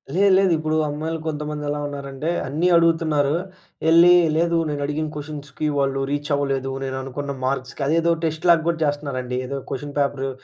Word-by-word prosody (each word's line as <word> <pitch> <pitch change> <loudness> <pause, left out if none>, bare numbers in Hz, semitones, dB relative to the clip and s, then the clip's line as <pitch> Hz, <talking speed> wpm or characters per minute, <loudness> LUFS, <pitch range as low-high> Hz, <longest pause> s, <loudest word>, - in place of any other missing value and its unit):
లేదు 200 +1 +4
లేదు. 195 -1 +3
ఇప్పుడు 155 0 -1
అమ్మాయిలు 155 +2 -3
కొంతమందెలా 150 -1 -3
ఉన్నారంటే 140 +1 -5 0.2
అన్ని 155 +6 0
అడుగుతున్నారు. 160 -4 +2 0.6
ఎళ్లి 170 +2 +7 0.2
లేదు 170 0 +2
నేనడిగిన 150 +1 -2
క్వెషన్స్‌కి 150 0 -5
వాళ్ళు 135 -1 +1
రీచ్ 145 +1 -2
అవ్వలేదు. 135 -1 -1
నేననుకున్న 135 +1 -4
మర్క్స్‌కి 130 +1 -2
అదేదో 165 +2 +3
టెస్ట్ 160 +1 -1
లాగా 165 -2 +5
గూడా 170 -1 0
జేస్తున్నారండి. 140 -4 -2
ఏదో 140 +1 -3
క్వెషన్ 145 +2 -5
పేపరు 140 -1 0
145 Hz, 145 wpm, -22 LUFS, 140-160 Hz, 0.6 s, ఎళ్లి